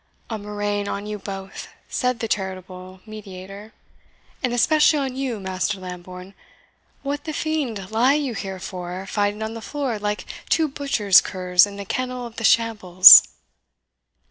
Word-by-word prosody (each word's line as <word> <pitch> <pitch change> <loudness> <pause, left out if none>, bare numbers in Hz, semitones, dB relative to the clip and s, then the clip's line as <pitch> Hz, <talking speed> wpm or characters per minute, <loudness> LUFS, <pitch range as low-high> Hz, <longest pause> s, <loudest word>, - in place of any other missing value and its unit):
"A 220 - -3
murrain 205 0 -3
on 200 +1 -4
you 210 0 -6
both," 195 -1 -8 0.2
said 250 -2 -2
the 225 - -2
charitable 185 -2 -5
mediator, 200 -1 -10 0.7
"and 250 - -1
especially 300 +6 +3
on 270 -3 -3
you, 260 -5 -3
Master 190 +1 -3
Lambourne! 180 +1 -10 0.7
What 285 +1 -4
the 310 - -4
fiend 260 -12 -3
lie 245 +5 +3
you 285 -5 -2
here 195 -3 -6
for, 180 0 -7
fighting 205 +2 -2
on 220 +1 -5
the 230 - -8
floor 270 -4 -4
like 210 0 -3 0.2
two 320 -1 +2
butchers' 255 - +3
curs 180 0 +2
in 200 - -10
the 200 0 -7
kennel 255 +3 -4
of 235 -1 -11
the 230 - -5
shambles?" 205 -6 +7
210 Hz, 150 wpm, -22 LUFS, 190-245 Hz, 0.7 s, shambles